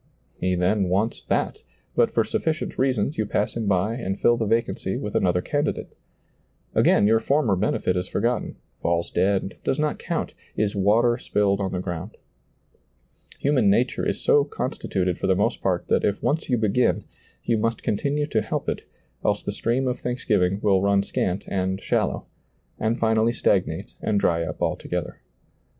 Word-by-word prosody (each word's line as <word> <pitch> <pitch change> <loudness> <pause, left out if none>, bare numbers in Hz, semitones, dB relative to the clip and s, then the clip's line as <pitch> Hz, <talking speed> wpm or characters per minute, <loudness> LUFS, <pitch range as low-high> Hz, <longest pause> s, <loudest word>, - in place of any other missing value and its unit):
He 90 0 +1
then 95 +2 +1
wants 105 +5 0
that, - - -1 0.3
but - - +4
for - - +2
sufficient 160 +1 -2
reasons 130 -1 +1
you 110 - 0
pass 105 - -1
him 115 -3 -2
by 100 +3 +2
and 100 -5 -3
fill 120 - +4
the 115 -2 -1
vacancy 115 +2 0
with - - -4
another 90 -1 +2
candidate. 145 0 -2 0.8
Again - - +4
your 110 +2 +4
former 135 -6 +2
benefit 90 -1 0
is 90 +1 -1
forgotten, 120 +4 -1 0.3
&lls 85 0 0
dead, 95 +1 +1
does 135 - 0
not 150 0 0
count, - - -3 0.2
is 105 -1 0
water 115 +5 +3
spilled 100 -4 +1
on 95 -2 -1
the 90 - -2
ground. 90 +3 -5 1.2
Human 135 -7 +3
nature 120 +6 +2
is - - -1
so 145 - +4
con 140 -2 -3
stituted 90 -2 -2
for - - -1
the 95 - +4
most 100 - 0
part - - 0
that - - +2
if 100 -1 0
once 155 +1 0
you 125 - +3
begin, 110 +3 +2 0.4
you 115 -2 +1
must 115 +1 -1
continue 145 +7 0
to 115 -7 0
help - - -3
it, - - -1 0.4
else 105 0 +1
the - - -2
stream 120 +5 0
of 125 - -1
thanksgiving 105 -6 0
will 95 -3 +4
run 100 0 +3
scant 95 0 -2
and 95 0 -1
shallow,' - - -1 0.5
and 110 +2 0
finally 110 +1 +2
stagnate - - 0
and 105 -2 +1
dry 85 -3 +2
up 80 -2 -4
altogether. - - -3
105 Hz, 170 wpm, -24 LUFS, 95-120 Hz, 1.2 s, but